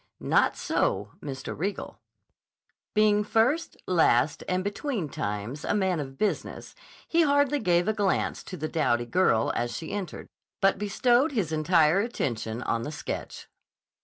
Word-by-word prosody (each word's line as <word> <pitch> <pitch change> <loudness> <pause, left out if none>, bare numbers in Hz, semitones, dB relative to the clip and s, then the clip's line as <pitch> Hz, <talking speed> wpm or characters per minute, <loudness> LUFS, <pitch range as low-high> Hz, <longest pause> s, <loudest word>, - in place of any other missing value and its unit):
Not - - +2
so 100 +2 -1
Mr. 135 -2 -6
Riegel. 195 +6 -4 1.0
Being 210 -1 +4
first, 230 +10 +1
last, 150 -6 +2
and 185 0 0
between 205 - -3
times 105 +6 -4
a - - 0
man 190 -4 +1
of 135 -2 -6
business, 210 - -2 0.3
he 335 - +3
hardly 285 -1 +3
gave 175 -4 +2
a 220 - +2
glance 205 -3 0
to 185 - -7
the 155 0 -3
dowdy 120 -8 +1
girl 120 -6 +2
as 120 0 -2
she 160 - -6
entered, 195 -5 -5 0.3
but 195 -1 +3
bestowed 240 +8 +2
his 195 - -1
entire 160 +2 +3
attention 120 - -2
on 115 - -1
the 145 - -5
sketch. 150 - -6
180 Hz, 145 wpm, -27 LUFS, 140-210 Hz, 1.0 s, Being